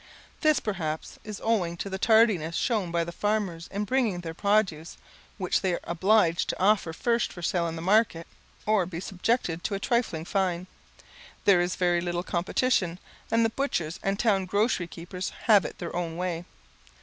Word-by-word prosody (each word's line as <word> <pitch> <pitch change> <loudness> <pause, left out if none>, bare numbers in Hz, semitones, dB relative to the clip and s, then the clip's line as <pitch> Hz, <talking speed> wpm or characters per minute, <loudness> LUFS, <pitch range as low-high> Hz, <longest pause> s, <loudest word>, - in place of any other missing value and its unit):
This, 310 -2 +3
perhaps, 160 -7 -4
is 210 -2 -7
owing 185 -7 +1
to 200 - -4
the 190 -1 -4
tardiness 215 -8 +4
shown 215 -7 0
by 170 0 0
the 170 - -6
farmers 195 -3 -1
in 205 +1 -3
bringing 250 -2 +1
in 175 - -5
their 165 -1 -6
produce, 195 -5 0 0.4
which 185 -2 0
they 185 -2 +1
are - - -1
obliged 175 0 +2
to - - -2
offer 195 -3 +3
first 235 +7 0
for 175 - -9
sale 170 0 +1
in 165 - -4
the 165 - -6
market, 195 -4 +2 0.4
or 210 -4 +2
be 170 -2 -5
subjected 180 -2 -1
to 205 - -1
a - - -3
trifling 225 -9 0
fine. 180 -2 0 0.8
There 195 -4 +6
is 175 +1 -1
very 175 -2 +2
little 175 0 -2
competition, 180 0 0 0.3
and 230 0 +3
the 225 - +1
butchers 180 - -2
and 195 0 0
town 200 -4 +2
grocery 205 -2 +1
keepers 180 +2 -6
have 210 -4 +5
it - - -6
their 170 - -6
own 170 -2 -3
way. 175 -1 -3
185 Hz, 185 wpm, -27 LUFS, 170-215 Hz, 0.8 s, There